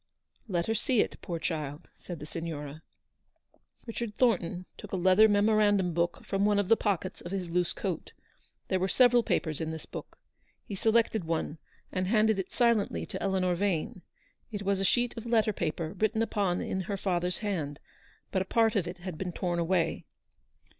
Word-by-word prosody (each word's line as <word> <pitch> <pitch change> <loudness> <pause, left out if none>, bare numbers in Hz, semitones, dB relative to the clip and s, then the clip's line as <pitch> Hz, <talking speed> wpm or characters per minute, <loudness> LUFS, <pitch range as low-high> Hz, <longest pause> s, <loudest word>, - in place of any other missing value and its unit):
" - - -38
Let 175 -5 0
her 225 - 0
see 235 +1 +2
it, - - -3
poor 170 -3 -3
child," 155 -1 -4
said 175 - -8
the 150 - -8
Signora. 155 -2 -6 1.0
Richard 230 -2 -4
Thornton 185 -7 +1
took - - -10
a - - +2
leather 190 +4 +6
memorandum 205 -3 +3
book 170 +1 0
from 195 0 0
one 205 0 +3
of 205 -2 +1
the 225 - +7
pockets 190 -4 -2
of 175 - -7
his 185 -3 -3
loose 180 0 +2
coat. 185 -5 -3 0.6
There 190 - +1
were 190 - +1
several 245 +4 +5
papers 160 -8 -1
in 160 - -2
this 160 -1 -6
book. - - -9 0.5
He - - -8
selected 220 0 +2
one, 160 -1 -2 0.3
and 185 -1 -1
handed 215 0 +3
it 190 - -3
silently 235 -4 +2
to 190 -3 -6
Eleanor 185 -2 +1
Vane. 180 -1 -1 0.5
It 205 -2 -4
was 200 0 +1
a - - 0
sheet 240 +5 +2
of 230 +1 -6
letter 220 -2 +3
paper, 160 -2 -2
written 220 +1 +1
upon 200 -5 0
170 - - -4
in 190 - 0
her 200 - -1
father's 180 -2 0
hand, 150 -8 -2 0.5
but 190 - +1
a - - -1
part 225 +2 +3
of 185 -4 +1
it 180 +1 -6
had 175 -2 -7
been 185 -2 -2
torn 175 0 -1
away. 170 0 0
190 Hz, 190 wpm, -30 LUFS, 175-215 Hz, 1.0 s, the